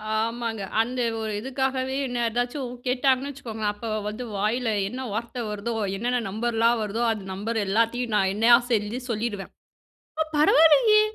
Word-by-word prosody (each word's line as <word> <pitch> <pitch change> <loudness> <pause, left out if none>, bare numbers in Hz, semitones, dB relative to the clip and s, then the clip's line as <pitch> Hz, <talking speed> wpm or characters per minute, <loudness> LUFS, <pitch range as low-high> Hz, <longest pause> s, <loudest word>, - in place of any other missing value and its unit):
ஆமாங்க. 230 0 -2 0.2
அந்த 250 +2 -3 0.2
ஒரு 220 -1 -3
இதுக்காகவே 265 +1 -2
என்ன 245 -1 -3
ஏதாச்சும் 245 +3 -2 0.2
கேட்டாங்கன்னு 260 +2 +2
வச்சுக்கோங்க, 225 -5 -7
அப்போ 225 +2 -7 0.2
வந்து 230 +4 -6
வாயில 225 +5 0 0.2
என்ன 260 +2 -5
வார்த்த 235 +3 -4
வருதோ, 210 +3 -3 0.2
என்னென்ன 245 +4 0
நம்பர்லாம் 230 +2 +1
வருதோ, 215 +3 -3
அந்த 205 -3 -7
நம்பர் 220 +4 -3
எல்லாத்தையும் 230 +3 +1
நான் 190 -1 +3
என்னையா 225 +3 +6 0.2
செஞ்சு 215 +2 0
சொல்லிருவேன். 215 -3 -3 0.7
ஆ - - +6
பரவாலயே 325 +9 +6
235 Hz, 140 wpm, -25 LUFS, 220-255 Hz, 0.7 s, என்னையா